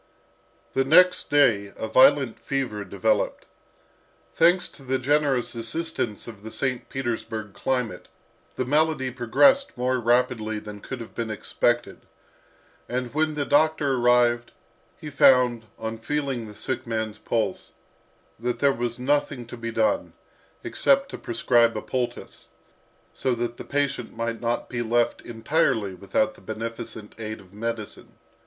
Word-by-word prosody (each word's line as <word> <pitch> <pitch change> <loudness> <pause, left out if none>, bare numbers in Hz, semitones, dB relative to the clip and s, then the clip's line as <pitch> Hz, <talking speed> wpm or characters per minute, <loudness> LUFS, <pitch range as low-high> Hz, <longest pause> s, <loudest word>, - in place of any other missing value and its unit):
The 135 - +2
next 180 +6 +5
day 110 -9 +3
a 110 - -3
violent 130 0 +5
fever 130 -7 -2
developed. 100 -1 0 0.9
Thanks 175 +2 +4
to - - -15
the 130 0 -1
generous 140 -1 +1
assistance 115 -2 -3
of 110 -4 -10
the 110 - -8
St. 125 +1 -3
Petersburg 115 -5 -4
climate, 125 -1 -2 0.5
the 130 - -1
malady 150 -1 +1
progressed 265 - +3
more 125 +1 +1
rapidly 120 -2 +1
than 105 -1 -8
could 130 +3 -7
have 115 - -10
been 115 -2 -3
expected, 110 - -1 0.9
and 125 0 -3
when 155 0 +1
the 145 -1 -1
doctor 150 -1 +3
arrived, 120 -1 +3 0.4
he 150 - -8
found, 125 -4 +4
on 110 0 -5
feeling 135 -2 -2
the 105 - -11
sick 130 +1 -4
man's 110 -2 -3
pulse, 115 -2 -2 0.7
that 120 +1 -2
there 140 -1 +3
was 120 -1 -3
nothing 135 -1 0
to 120 - -9
be 115 -1 -5
done, 285 - 0 0.5
except 275 0 +2
to - - -6
prescribe 115 0 +2
a - - -3
poultice, 125 -2 -4 0.7
so 130 -2 0
that 120 0 -3
the - - -7
patient 140 -5 -2
might 115 0 -3
not 120 0 -1
be 120 -1 -3
left 120 +1 +1
entirely 115 - 0
without 100 +3 0
the - - -19
beneficent 110 -1 -6
aid 110 -1 -5
of 95 0 -18
medicine. 110 0 -5
120 Hz, 140 wpm, -25 LUFS, 115-140 Hz, 0.9 s, next